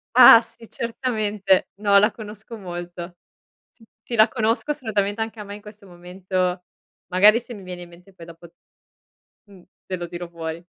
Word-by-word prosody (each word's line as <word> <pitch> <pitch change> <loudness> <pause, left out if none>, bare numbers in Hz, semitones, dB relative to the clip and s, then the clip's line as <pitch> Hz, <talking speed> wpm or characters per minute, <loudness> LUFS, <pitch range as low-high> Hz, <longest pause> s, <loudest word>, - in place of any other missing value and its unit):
Ah 230 - +10
sì, 230 -1 -16
certamente. 215 -5 -1
No, 200 0 +3
la 210 +2 +3
conosco 220 +1 -10
molto. 175 -2 -8 0.5
S 230 - -23 0.2
sì, 235 - -5
la 215 +1 +6
conosco, 225 +3 -1
assolutamente, 220 -6 -2
anche 225 0 -5
a - - -5
me 200 0 -8
in 210 - -12
questo 210 -1 -14
momento 180 +1 -3 0.5
magari 205 +5 +6
se 245 0 -11
mi 200 -3 -11
viene 180 -1 -8
in 175 - -14
mente 180 +3 -18
poi 170 -2 -13
dopo 170 0 -14 0.9
mh, 195 -4 -18 0.2
te 185 - -3
lo 175 0 -5
tiro 175 0 -7
fuori. 165 0 -7
200 Hz, 175 wpm, -22 LUFS, 175-220 Hz, 0.9 s, Ah